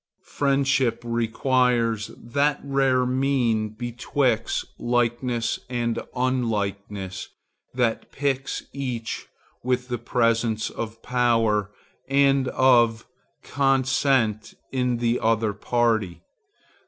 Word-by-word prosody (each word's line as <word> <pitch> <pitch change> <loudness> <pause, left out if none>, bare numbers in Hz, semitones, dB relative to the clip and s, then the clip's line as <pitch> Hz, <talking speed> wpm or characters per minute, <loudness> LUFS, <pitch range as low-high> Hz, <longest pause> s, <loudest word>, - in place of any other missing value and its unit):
Friendship 135 -3 +1
requires 115 -1 +1
that 140 +5 0
rare 135 -2 +2
mean 125 -4 +1
betwixt 120 +1 -1
likeness 120 -1 0
and 120 -2 -1 0.2
unlikeness 100 -6 -2 0.5
that 120 -3 0
piques 135 -1 -2
each 125 -5 -4 0.4
with 125 0 -1
the 120 -1 -2
presence 115 -2 0
of 115 0 -6
power 115 -5 +2 0.4
and 135 -1 +3
of 120 -4 +3 0.4
consent 135 -5 +1 0.2
in 125 -2 0
the 120 0 +1
other 110 -1 +1
party. 110 -3 0
120 Hz, 85 wpm, -24 LUFS, 115-130 Hz, 0.5 s, and